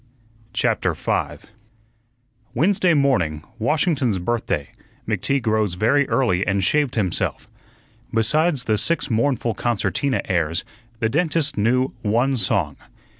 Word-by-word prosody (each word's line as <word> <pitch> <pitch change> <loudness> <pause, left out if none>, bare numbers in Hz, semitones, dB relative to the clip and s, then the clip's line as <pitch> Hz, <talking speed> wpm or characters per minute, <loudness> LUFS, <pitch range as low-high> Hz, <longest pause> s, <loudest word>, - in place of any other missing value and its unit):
CHAPTER - - 0
5 - - -2 1.1
Wednesday 180 -1 +3
morning, 90 - +1 0.2
Washington's 140 - +1
Birthday, 90 - -2 0.4
McTeague 140 -2 -1
rose 110 -4 +1
very 130 +9 +2
early 105 -8 +2
and 100 -1 +1
shaved 145 +4 +1
himself. 95 -7 -1 0.6
Besides 145 +6 +2
the 110 -3 +1
six 165 -5 0
mournful 115 0 +1
concertina 120 +4 -1
airs, 85 -1 -1 0.3
the 110 0 0
dentist 155 +1 +1
knew 125 +5 +1
one 120 +5 +1
song. 90 - -1
115 Hz, 110 wpm, -22 LUFS, 100-140 Hz, 1.1 s, Wednesday